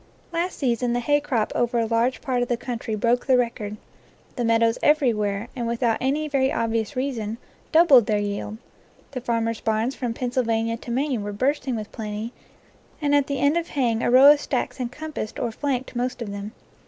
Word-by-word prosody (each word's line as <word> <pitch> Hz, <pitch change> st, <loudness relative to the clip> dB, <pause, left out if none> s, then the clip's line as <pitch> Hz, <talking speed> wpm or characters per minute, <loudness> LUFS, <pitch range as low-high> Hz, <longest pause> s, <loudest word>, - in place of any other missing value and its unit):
Last 345 Hz, +2 st, -1 dB
season 245 Hz, -2 st, 0 dB
the 245 Hz, -, +1 dB
hay 290 Hz, +4 st, +2 dB
crop 245 Hz, -7 st, -1 dB
over 240 Hz, 0 st, 0 dB
a 230 Hz, -, +2 dB
large 230 Hz, +3 st, +1 dB
part 255 Hz, -4 st, -1 dB
of 245 Hz, -, 0 dB
the 240 Hz, -, 0 dB
country 235 Hz, -3 st, -4 dB
broke 235 Hz, +4 st, +1 dB
the 260 Hz, -2 st, +5 dB
record. 220 Hz, -4 st, -2 dB, 0.6 s
The 245 Hz, -, -2 dB
meadows 230 Hz, 0 st, +2 dB
everywhere, 225 Hz, -8 st, +2 dB
and 240 Hz, -2 st, -2 dB
without 235 Hz, -1 st, 0 dB
any 285 Hz, +4 st, 0 dB
very 270 Hz, -2 st, +1 dB
obvious 230 Hz, +3 st, -1 dB
reason, 235 Hz, -5 st, -2 dB, 0.3 s
doubled 310 Hz, -9 st, +6 dB
their 215 Hz, -, +2 dB
yield; 205 Hz, +1 st, -3 dB, 0.5 s
the 255 Hz, -2 st, -5 dB
farmers' 230 Hz, -2 st, -1 dB
barns 220 Hz, +3 st, 0 dB
from 245 Hz, -3 st, -3 dB
Pennsylvania 230 Hz, -2 st, 0 dB
to 240 Hz, -, -11 dB
Maine 260 Hz, -1 st, 0 dB
were 205 Hz, 0 st, -4 dB
bursting 260 Hz, +4 st, 0 dB
with 215 Hz, -1 st, -6 dB
plenty, 215 Hz, +1 st, -5 dB, 0.7 s
and 290 Hz, -2 st, +1 dB
at 285 Hz, -1 st, +3 dB
the 280 Hz, -, -2 dB
end 285 Hz, +3 st, +3 dB
of 340 Hz, 0 st, -1 dB
haying 235 Hz, -5 st, 0 dB
a -, -, +1 dB
row 265 Hz, +4 st, +9 dB
of 295 Hz, -1 st, +3 dB
stacks 265 Hz, 0 st, -2 dB
encompassed 250 Hz, -1 st, -5 dB
or 235 Hz, -, -2 dB
flanked 260 Hz, +1 st, -3 dB
most 250 Hz, +1 st, -2 dB
of 205 Hz, -, -6 dB
them. 200 Hz, +2 st, -6 dB
240 Hz, 190 wpm, -24 LUFS, 225-270 Hz, 0.7 s, row